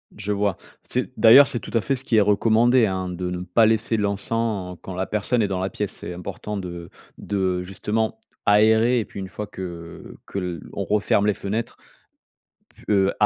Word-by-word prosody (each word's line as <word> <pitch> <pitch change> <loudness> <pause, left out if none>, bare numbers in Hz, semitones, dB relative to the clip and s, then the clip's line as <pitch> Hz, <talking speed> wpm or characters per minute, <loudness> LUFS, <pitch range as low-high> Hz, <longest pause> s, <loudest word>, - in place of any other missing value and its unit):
Je 105 0 -4
vois, 100 -2 0 0.3
c'est 125 0 -3
d'ailleurs, 130 +5 +8
c'est 120 - -2
tout - - -10
à 115 - +2
fait 135 - 0
ce 130 - -6
qui 115 - +1
est 110 - +6
recommandé 115 +4 +4
hein, 95 -2 -2
de 90 0 -4
ne 90 0 -4
pas 95 +6 +3
laisser 110 +1 +2
l'encens 100 -2 -2
quand 95 - -7
la 95 +1 -3
personne 110 +3 0
est 105 - +2
dans 95 -1 -2
la 95 +1 -1
pièce. 105 -2 -3
C'est - - -7
important 100 +4 -6
de 85 -2 -7 0.3
de 95 -3 -1
justement 110 +4 -2 0.3
aérer 110 +3 +4
et 110 - -2
puis - - -9
une 95 - -5
fois 105 +4 -6
que 85 -4 -8
que - - -6 0.2
l'on - - -6
referme 105 -1 +2
les 105 - +3
fenêtres, 110 +5 -4 1.0
p - - -18
heu, 95 0 +3
105 Hz, 195 wpm, -23 LUFS, 95-110 Hz, 1.0 s, d'ailleurs